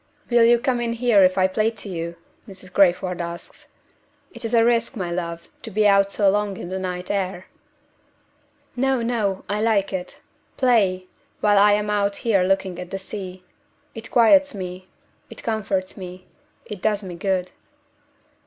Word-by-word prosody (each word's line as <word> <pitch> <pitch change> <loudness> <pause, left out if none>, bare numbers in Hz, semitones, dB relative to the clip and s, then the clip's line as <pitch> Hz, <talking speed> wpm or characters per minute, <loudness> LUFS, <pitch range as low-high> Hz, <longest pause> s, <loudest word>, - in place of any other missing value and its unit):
"Will 235 -1 +6
you 240 +1 +6
come 245 0 -1
in 230 -1 -1
here 235 -3 +3
if 185 0 +4
I 185 - +4
play 215 +4 +1
to 220 -2 -10
you?" 170 -2 -5 0.3
Mrs. 185 -1 -11
Crayford 180 -2 +2
asks. 170 0 -8 0.7
"It 235 0 -11
is 230 +1 -1
a 230 0 +5
risk, 235 +1 +1
my 180 -5 -3
love, 170 -1 -4
to - - -7
be 210 0 +2
out 200 0 +4
so 200 -1 +1
long 205 0 +1
in 175 - -7
the 190 +1 -3
night 180 -1 -4
air." 190 -2 -2 1.3
"No! 265 -1 +1
no! 215 -5 -1
I 205 +2 -1
like 215 -4 +1
it. 180 -1 -5 0.4
Play 200 -8 +2 0.3
while 205 -1 +4
I 205 +1 +6
am 210 0 0
out 200 -1 +1
here 210 -5 +3
looking 190 -1 0
at 180 -1 -7
the 195 - -4
sea. 190 -1 -8 0.5
It 225 0 -9
quiets 280 +3 +5
me; 185 -1 -7 0.4
it - - -11
comforts 200 -4 -2
me; 185 -1 -9 0.4
it 205 -3 -8
does 215 -1 0
me 185 -2 -7
good." 185 0 -2
200 Hz, 170 wpm, -22 LUFS, 185-225 Hz, 1.3 s, Will